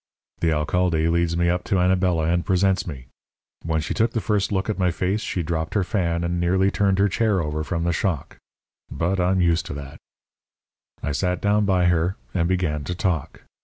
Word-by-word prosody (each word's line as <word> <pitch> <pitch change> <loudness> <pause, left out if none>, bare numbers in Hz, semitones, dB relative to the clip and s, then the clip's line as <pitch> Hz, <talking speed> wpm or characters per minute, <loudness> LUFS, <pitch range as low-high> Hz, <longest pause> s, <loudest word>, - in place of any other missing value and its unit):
"The 85 - +1
alcalde 80 +1 +1
leads 85 0 +1
me 85 0 +2
up 90 +1 0
to - - 0
Anabela 90 -2 +2
and 85 +1 +1
presents 95 0 +1
me. 65 -7 -7 0.6
When 80 -1 0
she 75 - -3
took 115 +1 +1
the 115 - 0
first 105 -2 0
look 95 0 0
at 110 -2 -2
my 90 -1 +3
face 95 +5 -1
she 90 - -2
dropped 80 +1 -3
her 100 - +3
fan 85 -4 -1
and 85 0 -1
nearly 95 +3 +2
turned 100 -2 +1
her 100 +1 +4
chair 105 0 +1
over 75 -1 -2
from 85 +1 -2
the 85 0 +1
shock. 85 -4 -2 0.5
But 90 +3 -1
I'm 90 +1 +2
used 85 -1 +2
to - - -5
that. 70 0 -9 1.0
"I 75 - -1
sat 90 +4 -1
down 105 +1 +2
by 95 -3 +2
her, 85 +2 +2 0.2
and 85 -3 +1
began 85 -5 0
to 90 - -3
talk. 85 -5 -2
90 Hz, 200 wpm, -23 LUFS, 85-95 Hz, 1.0 s, her